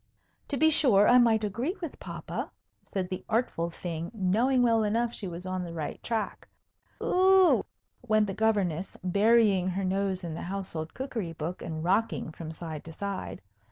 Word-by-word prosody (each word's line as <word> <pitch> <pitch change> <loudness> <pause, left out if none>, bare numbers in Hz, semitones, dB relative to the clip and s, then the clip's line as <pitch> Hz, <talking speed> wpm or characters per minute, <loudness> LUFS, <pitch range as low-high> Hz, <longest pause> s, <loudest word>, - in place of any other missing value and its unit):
"To 280 - -2
be 315 +3 +5
sure, 220 -10 +5
I 250 +1 +7
might 225 -2 +4
agree 235 - -2
with 330 -5 -6
papa," - - -5 0.3
said 190 -2 -3
the 185 - -4
artful 220 -7 0
thing, 170 -1 -5
knowing 230 +7 +2
well 230 -2 +4
enough 230 +3 0
she 200 - -5
was 175 +1 -7
on 185 0 -2
the 170 -1 -6
right 155 -2 -5
track. 225 -3 -3 0.6
"Oo - - -2 0.5
oo!" - - -5 0.4
went 215 -1 +4
the 195 - -4
Governess, 195 -5 0
burying 200 0 +4
her 190 +1 -1
nose 190 0 -1
in 170 -2 -4
the 160 - -5
household 175 -4 -5
cookery 230 -10 -4
book 165 +3 -5
and 160 -1 -5
rocking 195 -1 0
from 160 0 -7
side 160 -2 -7
to 165 - -8
side. 200 - -5
195 Hz, 175 wpm, -28 LUFS, 175-225 Hz, 0.6 s, I